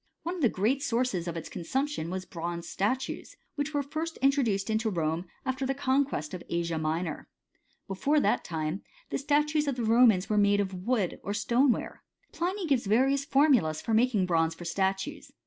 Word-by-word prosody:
One 345 Hz, -, -2 dB
of 365 Hz, -, -6 dB
the 245 Hz, -, +5 dB
great 230 Hz, +9 st, 0 dB
sources 230 Hz, -9 st, 0 dB
of 170 Hz, -, -3 dB, 0.2 s
consumption 265 Hz, -, -2 dB
was 185 Hz, +1 st, -4 dB
bronze 170 Hz, 0 st, -5 dB
statues, 255 Hz, +7 st, -2 dB, 0.2 s
which 290 Hz, +1 st, -2 dB
were 290 Hz, -2 st, 0 dB
first 320 Hz, +4 st, -4 dB
introduced 235 Hz, -7 st, +1 dB
into 220 Hz, +1 st, +1 dB
Rome 165 Hz, -2 st, -1 dB, 0.2 s
after 260 Hz, +1 st, -2 dB
the 270 Hz, +1 st, 0 dB
con 275 Hz, +1 st, +2 dB
quest 150 Hz, -, -5 dB
of 180 Hz, -, -5 dB
Asia 170 Hz, -1 st, -1 dB
Minor. 155 Hz, +1 st, -2 dB, 0.6 s
Before 275 Hz, +11 st, +1 dB
that -, -, +1 dB
time, 160 Hz, +2 st, -3 dB, 0.3 s
the -, -, -1 dB
statues 295 Hz, +1 st, +1 dB
of 275 Hz, -, 0 dB
the 245 Hz, -, -3 dB
Romans 225 Hz, -4 st, +5 dB
were 210 Hz, -1 st, +2 dB
made 205 Hz, 0 st, +4 dB
of 195 Hz, -1 st, -1 dB
wood 190 Hz, +1 st, -1 dB
or 200 Hz, -, -3 dB
stoneware. 240 Hz, +4 st, +1 dB, 0.3 s
Pliny 365 Hz, +3 st, -2 dB
gives 270 Hz, -9 st, +1 dB
various 270 Hz, +6 st, +3 dB
formulas 265 Hz, -, +3 dB
for 225 Hz, -, -2 dB
making 225 Hz, -4 st, +3 dB
bronze 165 Hz, -2 st, +1 dB
for 175 Hz, -, -9 dB
statues. 195 Hz, -, -2 dB
220 Hz, 180 wpm, -29 LUFS, 180-275 Hz, 0.6 s, the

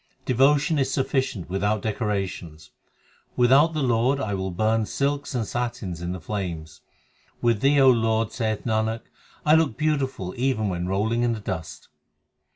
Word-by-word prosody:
Devotion 145 Hz, +4 st, +3 dB
is 135 Hz, 0 st, 0 dB
sufficient 130 Hz, -, -1 dB
without 100 Hz, +2 st, -1 dB
decorations: 95 Hz, -8 st, -3 dB, 0.6 s
Without 135 Hz, +7 st, +5 dB
the 155 Hz, -2 st, -1 dB
Lord 125 Hz, +3 st, +2 dB
I 110 Hz, -6 st, -2 dB
will 95 Hz, -1 st, -2 dB
burn 110 Hz, +4 st, 0 dB
silks 140 Hz, 0 st, -2 dB
and 115 Hz, -3 st, 0 dB
satins 115 Hz, -8 st, -4 dB
in 85 Hz, 0 st, -3 dB
the 90 Hz, -, -5 dB
flames; 80 Hz, -5 st, -5 dB, 0.6 s
With 115 Hz, -3 st, +1 dB
Thee, 140 Hz, +1 st, +4 dB
O 135 Hz, -1 st, +7 dB
Lord, 115 Hz, -2 st, +1 dB
saith 110 Hz, -3 st, -2 dB
Nanak, 110 Hz, 0 st, 0 dB, 0.4 s
I 150 Hz, -, +5 dB
look 160 Hz, -7 st, +3 dB
beautiful 135 Hz, -11 st, -1 dB
even 120 Hz, -5 st, 0 dB
when 90 Hz, -1 st, -3 dB
rolling 110 Hz, +5 st, 0 dB
in 120 Hz, -1 st, +2 dB
the 110 Hz, -, -5 dB
dust. 95 Hz, -6 st, -6 dB
115 Hz, 155 wpm, -24 LUFS, 95-135 Hz, 0.6 s, O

